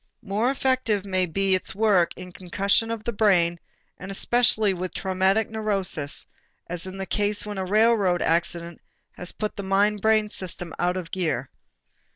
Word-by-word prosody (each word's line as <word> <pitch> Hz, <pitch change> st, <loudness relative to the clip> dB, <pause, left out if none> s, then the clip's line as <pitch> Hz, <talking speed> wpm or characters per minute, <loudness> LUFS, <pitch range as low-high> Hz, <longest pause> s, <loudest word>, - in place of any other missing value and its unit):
More 210 Hz, +5 st, 0 dB
effective 260 Hz, -7 st, 0 dB
may 185 Hz, -2 st, 0 dB
be 195 Hz, +3 st, 0 dB
its 185 Hz, 0 st, -1 dB
work 200 Hz, -5 st, +2 dB
in 180 Hz, 0 st, -9 dB
concussion 195 Hz, +5 st, 0 dB
of 230 Hz, -2 st, -4 dB
the 235 Hz, -, -2 dB
brain 175 Hz, -5 st, +3 dB, 0.4 s
and 190 Hz, -, -8 dB
especially 220 Hz, 0 st, +3 dB
with 185 Hz, 0 st, -5 dB
traumatic 190 Hz, +3 st, +1 dB
neuroses, 195 Hz, -9 st, -1 dB, 0.4 s
as 175 Hz, +1 st, -5 dB
in 190 Hz, +1 st, -7 dB
the 190 Hz, -, -4 dB
case 205 Hz, +1 st, 0 dB
when 205 Hz, -2 st, -5 dB
a 190 Hz, -, -2 dB
railroad 205 Hz, -3 st, +3 dB
accident 170 Hz, 0 st, -1 dB, 0.3 s
has 180 Hz, -, -4 dB
put 215 Hz, -1 st, -4 dB
the -, -, -4 dB
mind 200 Hz, +2 st, +1 dB
brain 220 Hz, -1 st, +3 dB
system 175 Hz, -4 st, -5 dB
out 180 Hz, +1 st, +1 dB
of 175 Hz, -3 st, -6 dB
gear. 155 Hz, -8 st, -2 dB
195 Hz, 165 wpm, -25 LUFS, 180-215 Hz, 0.4 s, brain